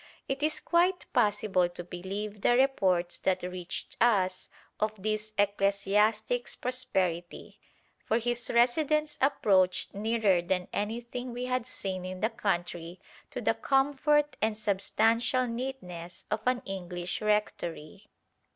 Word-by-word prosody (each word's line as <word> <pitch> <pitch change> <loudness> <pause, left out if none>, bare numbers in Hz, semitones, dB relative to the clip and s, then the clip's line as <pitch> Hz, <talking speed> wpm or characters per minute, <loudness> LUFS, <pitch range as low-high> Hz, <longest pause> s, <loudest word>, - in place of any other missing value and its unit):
It 270 +1 -2
is 305 +1 +1
quite 355 +2 +2
possible 205 -4 +2
to 175 0 -7
believe 195 +4 -5
the 240 - +4
reports 185 -10 +2
that 185 -1 0
reached 180 -1 -5
us 190 -6 +2 0.3
of 215 0 +1
this 215 0 -1
ecclesiastic's 205 +4 +1
prosperity, 185 -9 -2 0.4
for 220 - +1
his 240 +1 -2
residence 300 +5 +2
approached 195 -9 +3
nearer 210 -3 +2
than 180 +1 -1
anything 235 +3 -3
we 245 +1 -3
had 255 -1 -1
seen 190 -6 -4
in 185 0 -6
the 220 +4 +1
country 175 -5 -2 0.3
to - - -5
the - - +2
comfort 290 +2 +2
and 215 0 +1
substantial 225 +4 +2
neatness 230 -9 -6
of 215 0 0
an 250 -1 +2
English 180 -2 -4
rectory. 210 -4 -2
215 Hz, 125 wpm, -29 LUFS, 185-245 Hz, 0.4 s, the